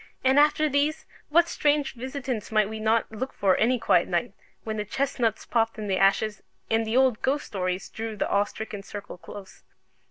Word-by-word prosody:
And 265 +2 +5
after 300 +1 +4
these, 295 +2 0 0.2
what 340 +3 +4
strange 295 -2 +1
visitants 255 -3 -5
might 215 -2 +3
we 220 +1 -6
not 220 +1 +1
look 255 +5 -4
for 195 -2 +2
any 250 +3 +3
quiet - - +3
night, - - -1 0.3
when 220 -1 -4
the 210 - -1
chestnuts 240 -1 -1
popped 225 -1 0
in 215 - -5
the 190 -1 0
ashes, 200 +2 +2 0.3
and 225 0 +2
the 225 +3 +1
old 260 -4 +3
ghost 285 +2 0
stories 185 -2 -3
drew 225 0 -5
the - - -1
awe 200 0 +2
stricken 210 -1 -7
circle 200 -2 -9
close? 195 0 -11
225 Hz, 190 wpm, -26 LUFS, 210-265 Hz, 0.3 s, And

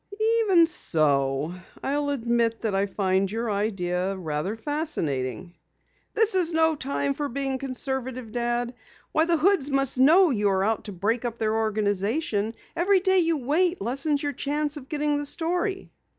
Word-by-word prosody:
"Even 370 -6 +5
so, 145 - +1 0.3
I'll 285 +1 0
admit 235 -3 0
that 220 -3 -1
I 195 +1 +1
find 190 -1 0
your 225 0 -2
idea 195 -2 -1
rather 160 +3 -3
fascinating." 180 - -3 0.6
"This 445 -1 +3
is 350 -3 +2
no 320 0 +3
time 280 0 -2
for 290 +1 -3
being 270 +1 -2
conservative, 260 -2 -4
Dad. 240 +1 -1 0.4
Why, 315 - +3
the 335 -1 +2
Hoods 325 -3 +3
must 275 -2 0
know 325 +6 +6
you 210 -4 +1
are 190 -1 +1
out 220 +1 -1
to 210 - -5
break 215 +6 -1
up 235 -1 -3
their 220 -1 0
organization. 215 - 0 0.2
Every 380 +3 +3
day 380 0 +4
you 330 -2 +2
wait 335 +7 +1
lessens 280 +4 -1
your 290 0 -1
chance 295 +2 -1
of 270 -3 -9
getting 295 -1 0
the 290 - -3
story." 355 +6 -2
255 Hz, 160 wpm, -25 LUFS, 205-305 Hz, 0.6 s, know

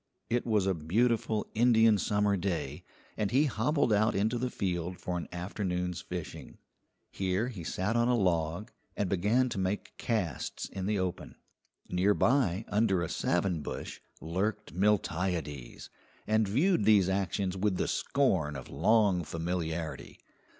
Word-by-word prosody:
It 120 +1 0
was 105 -4 +2
a 95 - +2
beautiful 110 +6 +1
Indian 115 -2 +5
summer 100 +3 +1
day, 90 -2 -3 0.3
and 105 -2 0
he 135 +8 +3
hobbled 130 -1 +1
out 110 +2 +3
into 110 +5 +1
the 125 +1 -1
field 90 -4 -2
for 90 - -4
an 85 - -4
afternoon's 90 -1 -3
fishing. 90 -3 -7 0.5
Here 95 +5 -1
he 100 -9 -7
sat 95 +6 -1
on 120 0 +3
a 125 -1 +3
log, 85 +1 0 0.3
and 100 - 0
began 105 +8 +2
to 100 - -3
make 95 +2 -2
casts 95 - -2
in 95 -1 -5
the 105 0 +1
open. 95 -2 -3 0.5
Nearby, 105 +2 +2
under 105 -4 +2
a 80 - -3
savin 90 -2 0
bush, - - -6 0.2
lurked 100 +6 -2
Miltiades, 90 -8 -1 0.3
and 110 -1 +2
viewed 145 - +2
these 105 -4 +5
actions 95 0 -1
with 95 -1 0
the - - 0
scorn 95 - +1
of 70 - -8
long 105 -6 +3
familiarity. 80 0 -4
100 Hz, 145 wpm, -30 LUFS, 90-110 Hz, 0.5 s, Indian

